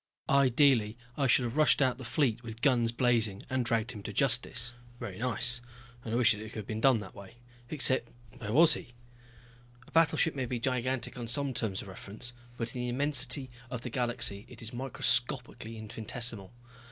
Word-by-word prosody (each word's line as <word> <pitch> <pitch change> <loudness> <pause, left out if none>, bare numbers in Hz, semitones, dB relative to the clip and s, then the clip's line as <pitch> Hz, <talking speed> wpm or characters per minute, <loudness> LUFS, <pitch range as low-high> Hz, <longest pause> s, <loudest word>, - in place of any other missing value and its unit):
Ideally 130 -4 +3 0.2
I 140 -2 +1
should 130 0 +4
have 120 +4 -4
rushed 155 - +4
out 130 -2 +1
the - - -7
fleet 120 -3 0
with 115 +1 -9
guns 120 -5 +3
blazing 115 -5 +1
and 130 -1 +1
dragged 115 0 0
him 105 -4 -8
to 105 - -6
justice. 125 +1 +2 0.3
Very 105 -6 -7
nice, 125 +1 0 0.4
and 110 - -6
I 115 - +1
wished 120 -2 +5
it 105 +1 -8
could 110 -2 -6
be 110 - -5
done 115 +3 +3
that 100 -3 -8
way. 100 0 -12 0.3
Except 130 -4 +2 0.3
where 105 -3 -5
was 160 +5 +6
he? 120 - -8 0.9
A - - -17
battleship 165 0 +3
may 130 -3 -3
be 120 0 -3
gigantic 125 -1 -2
on 120 - -5
some 135 +3 +1
terms 105 -5 -1
of - - -12
reference, 105 +5 -4 0.2
but 115 0 -3
in 125 - -3
the 125 - -2
immensity 140 0 +2 0.2
of 125 -2 -5
the 125 - -6
galaxy 120 -5 0
it - - -10
is 115 - -6
microscopically 125 -2 -1
infinitesimal. 110 -1 0
120 Hz, 185 wpm, -30 LUFS, 110-130 Hz, 0.9 s, was